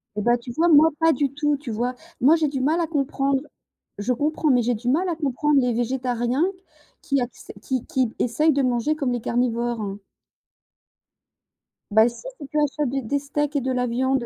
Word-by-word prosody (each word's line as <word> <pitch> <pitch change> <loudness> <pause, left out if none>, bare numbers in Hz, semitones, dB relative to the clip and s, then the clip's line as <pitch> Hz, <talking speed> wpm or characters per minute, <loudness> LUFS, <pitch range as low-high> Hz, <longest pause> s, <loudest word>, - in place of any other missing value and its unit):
Eh 210 - -2
bah, 240 +3 +3
tu 240 +1 -9
vois, 325 +8 +2
moi 315 0 +7
pas 325 0 +5
du 275 0 0
tout, 295 0 0
tu 270 -5 -7
vois? 240 +3 -1 0.3
Moi, 295 +6 +6
j'ai 315 -2 +1
du 275 -2 -3
mal 310 +6 +2
à 335 - 0
comprendre, 275 -2 0 0.6
je 225 +5 0
comprends, 300 +4 0
mais 250 -3 +4
j'ai 240 +1 +1
du 235 +3 -7
mal 340 +8 +2
à 340 - -1
comprendre 295 -1 +1
les 245 -1 +1
végétariens 245 +2 -1
q 380 - -20 0.4
qui 275 -2 0
acce 245 -1 -7
qui 260 0 -3
qui 255 -4 -1
essayent 300 +6 +2
de 280 - +1
manger 250 +4 +1
comme 275 -4 -1
les 245 -1 -2
carnivores. 235 -4 -1 1.9
Bah 220 +2 +6
si, 235 - -12 0.2
si 285 - -8
tu 305 - -3
achètes 295 -1 0
des 270 +2 -2
des 260 +4 -1
steaks 295 +1 -2
et 285 - +2
de 260 +1 -2
la 250 -1 0
viande? 260 +1 0
265 Hz, 205 wpm, -23 LUFS, 240-295 Hz, 1.9 s, moi